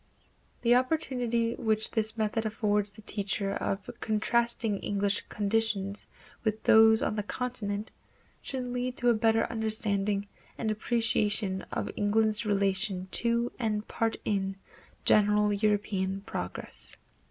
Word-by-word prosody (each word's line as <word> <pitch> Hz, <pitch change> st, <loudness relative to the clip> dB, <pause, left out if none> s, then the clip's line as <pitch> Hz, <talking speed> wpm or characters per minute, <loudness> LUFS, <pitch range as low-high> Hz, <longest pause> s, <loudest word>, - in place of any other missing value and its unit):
The 240 Hz, 0 st, +5 dB
opportunity 245 Hz, -4 st, +1 dB
which 220 Hz, -2 st, 0 dB
this 220 Hz, 0 st, +1 dB
method 220 Hz, 0 st, 0 dB
affords 210 Hz, -2 st, 0 dB
the 210 Hz, +1 st, -12 dB
teacher 200 Hz, -1 st, -1 dB
of 195 Hz, -1 st, -3 dB
contrasting 225 Hz, -1 st, +1 dB
English 200 Hz, 0 st, -1 dB
conditions 205 Hz, -1 st, -1 dB, 0.4 s
with 220 Hz, -1 st, -1 dB
those 220 Hz, +2 st, +6 dB
on -, -, 0 dB
the -, -, +1 dB
continent 215 Hz, -2 st, -3 dB, 0.5 s
should 260 Hz, -2 st, -4 dB
lead 250 Hz, +1 st, -3 dB
to 245 Hz, -, +3 dB
a -, -, +6 dB
better 225 Hz, 0 st, +3 dB
understanding 210 Hz, -3 st, 0 dB, 0.3 s
and 220 Hz, -2 st, -1 dB
appreciation 215 Hz, -3 st, 0 dB
of -, -, -2 dB
England's 215 Hz, +1 st, +2 dB
relation 195 Hz, -1 st, 0 dB
to 235 Hz, 0 st, +1 dB
and 215 Hz, -3 st, -1 dB
part 225 Hz, -1 st, -1 dB
in 195 Hz, -2 st, -1 dB, 0.5 s
general 210 Hz, 0 st, +4 dB
European 200 Hz, -2 st, 0 dB
progress. 90 Hz, -, -4 dB
215 Hz, 120 wpm, -29 LUFS, 205-230 Hz, 0.5 s, those